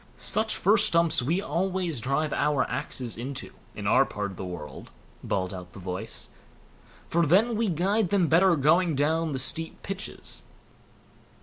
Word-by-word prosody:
"Such 220 Hz, +1 st, +1 dB
fir 205 Hz, +4 st, +3 dB
stumps 170 Hz, -, +4 dB
we 170 Hz, +10 st, 0 dB
always 180 Hz, -6 st, -1 dB
drive 140 Hz, +5 st, -1 dB
our 145 Hz, -3 st, +1 dB
axes 125 Hz, -3 st, -4 dB
into, 135 Hz, +3 st, -6 dB, 0.2 s
in 105 Hz, -, -6 dB
our 120 Hz, +6 st, +5 dB
part 105 Hz, -6 st, -4 dB
of -, -, -10 dB
the -, -, -5 dB
world", 75 Hz, -7 st, -8 dB, 0.3 s
bawled 95 Hz, -1 st, -2 dB
out 90 Hz, 0 st, -9 dB
the -, -, -12 dB
voice; 90 Hz, 0 st, -5 dB, 0.8 s
"for 170 Hz, +1 st, +2 dB
then 205 Hz, +9 st, +3 dB
we 225 Hz, -1 st, 0 dB
guide 190 Hz, +4 st, +1 dB
them 190 Hz, -3 st, +2 dB
better 170 Hz, +3 st, +5 dB
going 160 Hz, +3 st, +3 dB
down 160 Hz, +3 st, +1 dB
the 135 Hz, -, -2 dB
steep 160 Hz, +5 st, -2 dB
pitches." 195 Hz, 0 st, -4 dB
160 Hz, 160 wpm, -27 LUFS, 125-185 Hz, 0.8 s, our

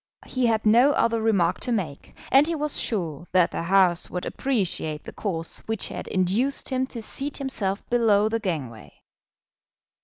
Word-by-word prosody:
He 255 Hz, -2 st, 0 dB
had 220 Hz, -1 st, +1 dB
no 240 Hz, +7 st, +5 dB
other 230 Hz, -3 st, +1 dB
remark 195 Hz, -6 st, +2 dB
to 250 Hz, -, -3 dB
make, 175 Hz, -11 st, -4 dB, 0.2 s
and 275 Hz, +3 st, +6 dB
he 335 Hz, -, -1 dB
was 300 Hz, -1 st, -2 dB
sure 170 Hz, -, -2 dB
that 180 Hz, -2 st, +4 dB
the -, -, -3 dB
House 180 Hz, 0 st, +3 dB
would 180 Hz, -, -4 dB
appreciate 185 Hz, -, -2 dB
the -, -, -9 dB
course 165 Hz, -6 st, -3 dB
which 225 Hz, -2 st, -2 dB
had -, -, -6 dB
induced 200 Hz, +9 st, 0 dB
him 260 Hz, 0 st, 0 dB
to 235 Hz, -4 st, -6 dB
seat 275 Hz, +6 st, -2 dB
himself 210 Hz, -8 st, -3 dB
below 220 Hz, -4 st, +3 dB
the 225 Hz, +1 st, -1 dB
gangway. 145 Hz, -, -5 dB
215 Hz, 165 wpm, -25 LUFS, 180-245 Hz, 0.2 s, and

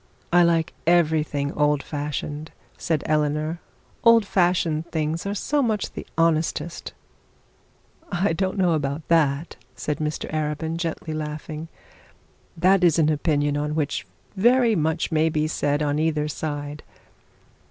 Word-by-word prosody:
'I 175 Hz, -, +7 dB
like 165 Hz, -1 st, +1 dB
everything 155 Hz, -4 st, +2 dB
old 150 Hz, -1 st, +1 dB
fashioned,' 150 Hz, +1 st, -4 dB, 0.3 s
said 160 Hz, -3 st, -1 dB
Eleanor; 150 Hz, +2 st, 0 dB, 0.4 s
'old 230 Hz, -2 st, +6 dB
fashioned 175 Hz, -4 st, +1 dB
things 160 Hz, +3 st, -2 dB
are 200 Hz, -, -2 dB
so 290 Hz, +8 st, 0 dB
much 220 Hz, -5 st, -1 dB
the -, -, -8 dB
honestest.' 165 Hz, 0 st, 0 dB, 1.2 s
'I 175 Hz, -1 st, +1 dB
don't 190 Hz, +3 st, -1 dB
know 180 Hz, -3 st, +3 dB
about 145 Hz, 0 st, -2 dB
that,' 155 Hz, -1 st, +2 dB, 0.2 s
said 150 Hz, -, -3 dB
Mr 150 Hz, 0 st, -3 dB
Arabin, 155 Hz, +1 st, -2 dB
gently 165 Hz, -1 st, -3 dB
laughing. 155 Hz, +1 st, -5 dB, 0.9 s
'That 185 Hz, +2 st, +4 dB
is 170 Hz, -3 st, +5 dB
an 155 Hz, -2 st, +3 dB
opinion 145 Hz, -1 st, +1 dB
on 150 Hz, +1 st, -1 dB
which 145 Hz, -9 st, -2 dB, 0.3 s
very 235 Hz, +2 st, +4 dB
much 160 Hz, -2 st, 0 dB
may 160 Hz, 0 st, +3 dB
be 155 Hz, -1 st, 0 dB
said 145 Hz, -1 st, 0 dB
on 145 Hz, 0 st, 0 dB
either 155 Hz, -1 st, +1 dB
side. 145 Hz, -1 st, -4 dB
155 Hz, 130 wpm, -24 LUFS, 150-170 Hz, 1.2 s, I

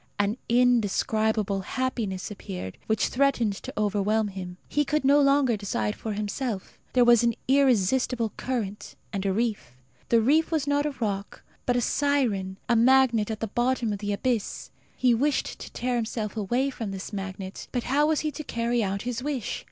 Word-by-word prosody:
An 205 Hz, +3 st, +1 dB
indescribable 220 Hz, -3 st, +2 dB
happiness 215 Hz, -4 st, -3 dB
appeared, 185 Hz, -, -7 dB
which 220 Hz, -1 st, +2 dB
threatened 250 Hz, -5 st, +2 dB
to -, -, -7 dB
overwhelm 210 Hz, +1 st, +1 dB
him. 180 Hz, -2 st, -7 dB
He 295 Hz, -, +1 dB
could 295 Hz, 0 st, 0 dB
no 285 Hz, +2 st, +6 dB
longer 275 Hz, -3 st, +4 dB
decide 115 Hz, -, -2 dB
for 220 Hz, -, -4 dB
himself. 210 Hz, 0 st, -4 dB
There 250 Hz, -1 st, +5 dB
was 240 Hz, -2 st, +6 dB
an 235 Hz, -2 st, +2 dB
irresistible 250 Hz, -3 st, +2 dB
current 220 Hz, -6 st, -4 dB, 0.2 s
and 195 Hz, -2 st, -2 dB
a -, -, +2 dB
reef. 210 Hz, -, -2 dB, 0.4 s
The 230 Hz, -, +5 dB
reef 295 Hz, +8 st, +3 dB
was 315 Hz, -4 st, 0 dB
not 285 Hz, +1 st, +1 dB
a -, -, -2 dB
rock, 200 Hz, -3 st, -3 dB, 0.2 s
but 245 Hz, -, +2 dB
a 245 Hz, -, +2 dB
siren 235 Hz, -10 st, 0 dB
a 240 Hz, -, +3 dB
magnet 235 Hz, -2 st, +4 dB
at 220 Hz, -1 st, -4 dB
the -, -, +1 dB
bottom 240 Hz, 0 st, 0 dB
of 200 Hz, -, -4 dB
the 205 Hz, 0 st, -2 dB
abyss. 225 Hz, +1 st, -2 dB, 0.3 s
He 250 Hz, -2 st, +4 dB
wished 280 Hz, +5 st, 0 dB
to -, -, -9 dB
tear 250 Hz, 0 st, -1 dB
himself 220 Hz, -2 st, -3 dB
away 240 Hz, +6 st, 0 dB
from 225 Hz, -5 st, -5 dB
this 195 Hz, +2 st, -6 dB
magnet; 195 Hz, -1 st, -6 dB
but 245 Hz, -2 st, -1 dB
how 290 Hz, +4 st, +2 dB
was 315 Hz, -1 st, +1 dB
he 310 Hz, -, -1 dB
to 305 Hz, -, -7 dB
carry 235 Hz, -2 st, 0 dB
out 195 Hz, 0 st, -2 dB
his 245 Hz, -1 st, -3 dB
wish? 270 Hz, -5 st, -3 dB
230 Hz, 180 wpm, -26 LUFS, 205-260 Hz, 0.4 s, no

